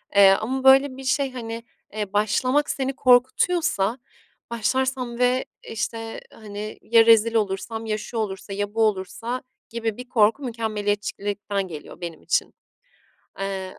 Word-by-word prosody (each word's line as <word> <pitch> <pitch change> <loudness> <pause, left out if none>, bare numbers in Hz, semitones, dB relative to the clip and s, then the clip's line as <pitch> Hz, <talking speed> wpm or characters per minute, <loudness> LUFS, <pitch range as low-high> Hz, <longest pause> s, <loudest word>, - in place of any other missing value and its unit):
Eee, 200 -1 +8
ama 250 +7 0
böyle 265 0 +6
bir 270 - -8
şey, 265 0 +1
hani, 230 -2 -6 0.3
eee, 210 -2 -4
başlamak 255 +8 +2
seni 270 0 -1
korkutuyorsa, 255 - +3 0.5
"Başlarsam 250 +1 -1
ve, 250 +1 +2 0.2
işte, 225 +1 -4
hani, 210 -1 -8
ya 230 0 +5
rezil 230 0 +5
olursam, 220 +2 -1
ya 215 -1 -1
şu 230 +2 -7
olursa, 195 -2 -3
ya 205 +1 -3
bu 225 - 0
olursa." 220 +5 -2 0.3
gibi 225 -2 -3
bir 250 0 -9
korku 225 +4 +3
mükemmeliyetçilikten 205 -3 -2
geliyor 160 0 -10
benim 170 -2 -6
için. - - 0 0.9
Eee, 195 -1 -4
225 Hz, 135 wpm, -24 LUFS, 205-250 Hz, 0.9 s, Eee